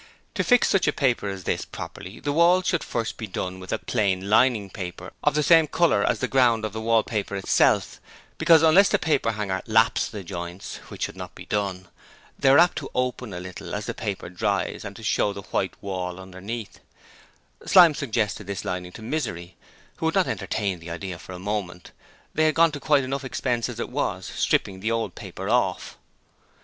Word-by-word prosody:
To - - 0
fix 245 -2 +4
such 195 - +2
a - - +4
paper 125 -7 +1
as 95 -1 -6
this - - -1
properly 95 +5 -9
the 145 - -2
walls 175 +3 +4
should 175 -3 +1
first 115 -2 -3
be 110 - -5
done 95 -1 -4
with 95 - -8
a - - +1
plain 100 -3 -1
lining 110 -4 +3
paper 90 -1 -7
of 150 - +2
the 150 - +2
same 165 -1 +6
colour 165 -11 +2
as - - +1
the 130 - -1
ground 120 -5 +3
of 105 - -5
the 110 - -4
wallpaper 110 -2 0
itself, 95 - +2 0.4
because 160 -1 +6
unless 175 +5 +6
the - - +3
paperhanger 105 - 0
'lapps' 110 0 +3
the 105 -3 -7
joints 85 0 -6
which - - -6
should - - -3
not - - -8
be - - -10
done 95 -3 -2 0.5
they 135 - +4
are 135 - +7
apt 175 +1 +4
to 140 - -7
open 125 -2 -1
a 90 - -5
little 90 +1 -7
as - - -4
the - - -3
paper 100 -2 -4
dries 100 +3 -2
and 100 -1 -7
to 115 - -11
show 105 -1 +1
the 100 - -8
white - - -1
wall 90 -2 -4
underneath 95 +4 -7 0.8
Slyme 175 -4 +7
suggested 110 - -2
this 100 -2 -4
lining 90 0 -4
to 110 - -10
Misery, 95 - -4 0.4
who - - -1
would - - -1
not - - +4
entertain 100 -4 -2
the 85 +1 -10
idea 85 +1 -5
for 95 - -10
a - - -7
moment 95 -2 -4 0.4
they 155 - +2
had 155 - +2
gone 165 0 +5
to 145 - -6
quite 145 -1 +3
enough 135 +2 -3
expense 125 -2 -1
as - - -7
it - - -3
was, - - -2
stripping 95 -1 0
the 110 +4 -2
old 115 0 -1
paper 95 -2 -7
off! 110 -5 0
105 Hz, 205 wpm, -25 LUFS, 95-135 Hz, 0.8 s, are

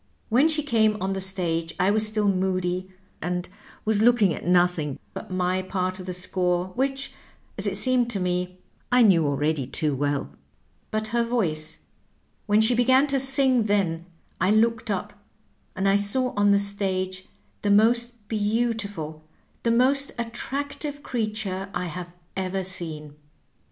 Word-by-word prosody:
When 255 +7 +4
she 310 -2 +1
came 220 -6 +2
on 195 0 -1
the 190 - -2
stage 170 -4 0
I 185 +2 +3
was 215 +1 +2
still 215 -1 0
moody, 185 -1 0 0.3
and 180 0 -2 0.4
was 215 -1 +2
looking 220 -6 +4
at - - -7
nothing 175 -5 +2 0.2
but - - -7
my 185 0 0
part 185 0 -2
of 185 - -8
the - - -2
score, 180 0 -1
which, 270 +3 -2 0.4
as - - -3
it - - -1
seemed 255 -2 +2
to 210 -4 -2
me, 180 0 -2 0.3
I 250 0 +6
knew 170 -8 +5
already 145 -1 0
too 150 +1 -1
well. 145 +1 -1 0.6
But 215 0 -2
her 235 +1 +1
voice 175 -11 -1 0.3
— - - -38
^when 210 +1 +5
she 230 +3 +4
began 260 +3 +4
to 275 - +3
sing 265 -3 +3
then 180 -5 0 0.3
I 185 - +2
looked 225 +1 +2
up, 195 -3 -2 0.6
and 190 +1 0
I 195 +1 +5
saw 250 +6 0
on 205 0 +3
the 200 - +5
stage 190 -2 -2 0.4
the 205 - 0
most 235 +1 +3
beautiful, 205 -8 -2 0.4
the 235 - 0
most 265 +4 +3
attractive 280 +5 -4
creature 215 -4 -3
I 180 +1 -1
have 175 +1 -6 0.2
ever 190 0 -2
seen. 155 -5 -4
200 Hz, 155 wpm, -25 LUFS, 180-235 Hz, 0.6 s, I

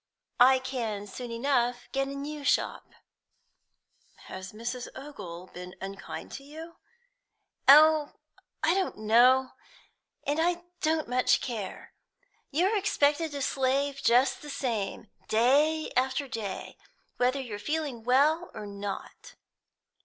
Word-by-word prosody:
I 260 +2 +7
can 235 -6 -4
soon 240 +5 -7
enough 245 0 0
get 270 0 0
a 275 - -6
new 290 +1 -6
shop." 280 - 0 1.3
"Has 185 0 -8
Mrs. 240 +3 -5
Ogle 185 -11 -9
been 180 0 -9
unkind 195 0 -7
to 275 - -8
you?" 320 +4 -10 0.9
"Oh, 305 +1 +7 0.5
I 325 - +4
don't 385 0 -1
know, 245 +4 +4 0.7
and 290 +2 0
I 345 +1 +1 0.2
don't 315 0 +1
much 250 +1 +3
care. 225 -6 -6 0.6
You're 375 +8 +2
expected 320 -5 +2
to 280 -1 -3
slave 275 +1 0
just 250 +3 +3
the 295 - -9
same, 230 -7 -3 0.2
day 290 +8 +3
after 265 +2 +1
day, 215 -6 -5 0.4
whether 255 +2 +2
you're 225 -6 -6
feeling 290 -1 -3
well 295 +8 +3
or 210 - -6
not." 205 - -7
265 Hz, 120 wpm, -28 LUFS, 230-295 Hz, 1.3 s, I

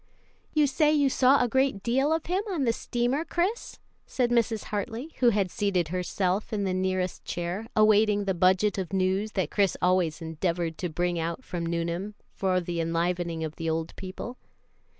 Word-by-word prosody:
"You 305 -1 +5
say 300 +2 +3
you 285 -3 +3
saw 260 +1 +4
a - - +1
great 265 -4 +1
deal 265 +5 +2
of 320 0 0
him 365 +3 0
on 340 -8 -1
the 230 -3 +2
steamer, 245 +5 -1
Chris?" 360 +7 -2 0.3
said 245 -2 0
Mrs. 230 -2 +1
Hartley, 230 +8 -3
who 245 - +6
had 200 -5 0
seated 185 -5 0
herself 185 +3 -1
in 210 -2 -1
the 190 -1 0
nearest 185 -1 -1
chair, 175 +6 -4
awaiting 215 -1 +4
the 195 - +1
budget 185 +3 +3
of 190 0 -4
news 190 +3 0
that 185 -6 -1
Chris 200 -2 +2
always 180 -3 +2
endeavored 165 0 -2
to 180 - -2
bring 175 +2 -1
out 170 +10 -3
from 170 -6 -4
Nuneham, 170 +4 -2 0.2
for 185 -1 +1
the 175 -1 -3
enlivening 170 0 -1
of 155 -1 -5
the 165 0 -2
old 160 0 -2
people. 195 +6 -7
195 Hz, 180 wpm, -27 LUFS, 175-240 Hz, 0.3 s, who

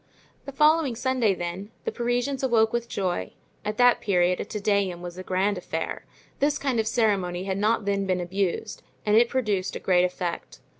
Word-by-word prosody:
The 275 - -6
following 300 -2 +3
Sunday, 245 -4 +1
then, 175 +3 -5 0.2
the - - -1
Parisians 245 +3 -1
arose 230 -4 +3
with 235 0 -2
joy; 180 - -2 0.3
at 210 0 -3
that 245 -1 +5
period 180 -2 +2
a - - -3
Te 210 - -5
Deum 200 -4 0
was 175 -1 -6
a 185 - -7
grand 190 +1 0
affair; 160 -2 -4 0.3
this 290 +1 +2
kind 265 -5 -1
of 220 - 0
ceremony 195 -6 +1
had 190 0 -2
not 215 +1 +1
then 200 -1 0
been 185 -1 +1
abused 190 +3 -2 0.2
and 210 0 +3
it 235 +1 +5
produced 210 -8 -1
a - - -3
great 180 -1 +3
effect. 180 -1 -3
205 Hz, 190 wpm, -26 LUFS, 185-240 Hz, 0.3 s, that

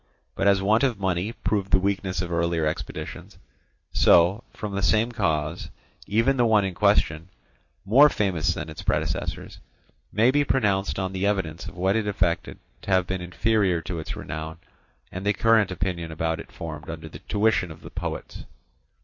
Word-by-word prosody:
But 100 - 0
as 100 -1 +4
want 110 +3 +3
of 125 -7 +1
money 95 +2 -1
proved 100 -4 -2
the - - +5
weakness 95 -1 -1
of 85 - -6
earlier 85 -1 0
expeditions, 75 - -5 0.6
so 90 +6 +5
from 105 -2 -6
the 100 - -1
same 110 +5 +2
cause 80 -6 -1 0.4
even 115 +7 +2
the 120 - +4
one 105 -3 +4
in 95 - -3
question, 80 0 +2 0.6
more 135 +9 +7
famous 95 - 0
than - - -5
its 80 -1 -8
predecessors, - - -2 0.5
may 115 +4 +4
be 145 +1 +3
pronounced 100 -8 +1
on 95 0 -2
the 95 +1 0
evidence 85 -6 -2
of - - -10
what 95 +3 +1
it 110 -2 0
effected 85 -4 -1 0.2
to - - -9
have 95 -1 +3
been 95 0 -3
inferior 95 0 +1
to 85 0 -4
its 80 - -5
renown 80 +2 -6 0.5
and 95 - -6
to 100 - +1
the 105 - 0
current 115 -3 +4
opinion 85 -2 -3
about 80 +1 -2
it - - -10
formed 80 -1 -7
under 80 -1 -6
the 75 -1 -10
tuition 105 -1 +1
of 80 0 -11
the - - -11
poets. - - -6
95 Hz, 180 wpm, -25 LUFS, 85-105 Hz, 0.6 s, more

